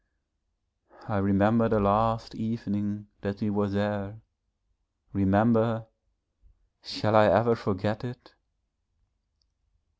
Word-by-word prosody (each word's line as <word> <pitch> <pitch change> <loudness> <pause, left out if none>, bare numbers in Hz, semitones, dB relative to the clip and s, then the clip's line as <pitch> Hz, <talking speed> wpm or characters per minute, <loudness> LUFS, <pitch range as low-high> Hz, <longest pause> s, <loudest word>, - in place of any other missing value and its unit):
I 105 - -2
remember 100 +4 +3
the 110 - +2
last 110 +3 +1
evening 105 -2 -4 0.2
that 100 0 -5
we 105 -2 -2
were 100 0 -1
there 100 +1 -3 0.9
remember 110 +3 +2 1.0
shall 105 0 -1
I 105 -1 +7
ever 115 +3 +4
forget 105 -1 -3
it? 125 -1 -10
105 Hz, 90 wpm, -27 LUFS, 100-115 Hz, 1.0 s, I